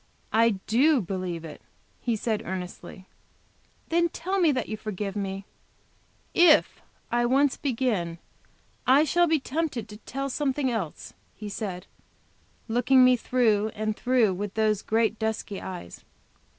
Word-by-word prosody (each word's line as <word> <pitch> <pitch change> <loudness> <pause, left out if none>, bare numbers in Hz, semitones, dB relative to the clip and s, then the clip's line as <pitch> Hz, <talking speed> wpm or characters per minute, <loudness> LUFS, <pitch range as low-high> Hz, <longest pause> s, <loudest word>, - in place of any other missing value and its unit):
"I 225 -1 +4
do 275 +6 +4
believe 180 -4 -4
it," 155 - -10 0.4
he 235 -2 -1
said 220 0 -1
earnestly. 185 0 -7 0.8
"Then 340 +1 +2
tell 375 +4 -2
me 335 -4 +4
that 260 - -2
you 215 - -3
forgive 210 -2 -5
me!" 195 -1 -4 0.9
"If 345 -3 +5 0.3
I 240 0 +2
once 275 +2 +3
begin, 225 - -1 0.7
I 270 +4 +6
shall 345 +3 +3
be 320 -1 +2
tempted 270 -4 -3
to 210 - -9
tell 275 +5 -5
something 270 -1 0
else," 195 -10 -4 0.2
he 210 -1 -7
said, 195 -4 -5 0.8
looking 250 +3 +4
me 255 0 +6
through 225 -4 +2
and 215 0 -2
through 245 -5 +2
with 200 +2 -5
those 215 -2 +1
great 225 0 0
dusky 220 -2 -3
eyes. 180 - -8
225 Hz, 135 wpm, -26 LUFS, 205-265 Hz, 0.9 s, I